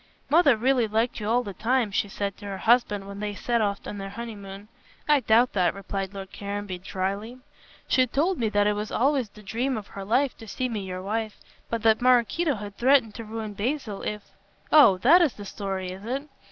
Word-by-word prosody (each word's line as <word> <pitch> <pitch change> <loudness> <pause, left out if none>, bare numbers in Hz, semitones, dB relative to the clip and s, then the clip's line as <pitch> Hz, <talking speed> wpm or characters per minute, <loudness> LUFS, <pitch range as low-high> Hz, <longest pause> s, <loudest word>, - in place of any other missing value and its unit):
"Mother 295 -6 +5
really 250 0 +2
liked 225 +3 0
you 210 0 -3
all 245 +2 +2
the 200 - -6
time," 230 +1 0
she 200 0 0
said 200 0 -3
to 205 - -9
her 195 -1 -4
husband 210 -3 +2
when 200 0 -8
they 210 0 -3
set 235 +2 0
off 200 -1 -1
on 205 - -6
their 195 0 -5
honeymoon. 200 -2 -8 0.4
"I 295 -1 +5
doubt 235 +1 +3
that," 180 -2 +2
replied 195 -1 -4
Lord 195 -1 -8
Caranby, 200 -2 -5
dryly. 195 +6 -4 0.5
"She 255 -1 +3
told 320 +9 0
me 225 -2 +1
that 205 0 +2
it 210 - +3
was 210 +1 -4
always 265 -2 +1
the 210 +1 -16
dream 235 +6 -1
of 210 - -6
her 195 - -7
life 250 +7 +1
to 225 - -11
see 255 +4 -2
me 220 -3 -3
your 185 -1 -6
wife, 215 +1 -3 0.3
but 230 -1 -3
that 220 0 +4
Maraquito 255 +5 +3
had 205 -1 -8
threatened 255 -3 +4
to 230 - -7
ruin 220 -1 -6
Basil 220 0 -3
if 210 -1 -5 0.2
" - - -36
"Oh, 285 -12 +7
that 305 - +6
is 310 -9 +3
the 205 - -10
story, 190 -2 -4
is 190 +2 -9
it? 265 +6 -3
215 Hz, 220 wpm, -26 LUFS, 200-245 Hz, 0.5 s, Oh